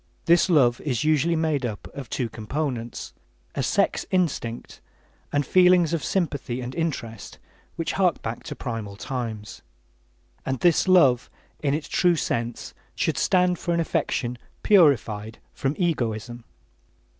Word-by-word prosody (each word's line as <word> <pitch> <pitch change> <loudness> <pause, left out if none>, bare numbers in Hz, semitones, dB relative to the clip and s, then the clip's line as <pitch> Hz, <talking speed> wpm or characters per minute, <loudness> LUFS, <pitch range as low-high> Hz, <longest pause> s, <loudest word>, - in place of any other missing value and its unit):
This 170 +2 +4
love 130 -8 +4
is 125 -7 -1
usually 155 +2 +2
made 160 -4 0
up 110 -5 -4
of 135 -5 -8
two 125 +1 -1
components: 120 +2 -4 0.4
a - - -2
sex - - +1
instinct, 160 -11 -2 0.5
and 145 -1 +1
feelings 180 0 +5
of 160 -5 -1
sympathy 145 -9 -1
and 125 0 -5
interest 130 -10 -4 0.4
which 165 -1 -2
hark 185 -3 +2
back 115 +1 -4
to - - -6
primal 115 -5 -5
times. 110 -2 -5 0.8
And 130 -1 -2
this 175 +1 +3
love, 140 -10 +5 0.3
in 145 -1 +1
its 155 - -4
true 175 -1 +3
sense, 120 -6 -3 0.2
should - - 0
stand 180 -2 +2
for 170 -1 -1
an - - +1
affection 125 -6 -1 0.2
purified 115 - +3 0.2
from 135 +2 -2
egoism. 120 - -2
140 Hz, 135 wpm, -24 LUFS, 120-170 Hz, 0.8 s, feelings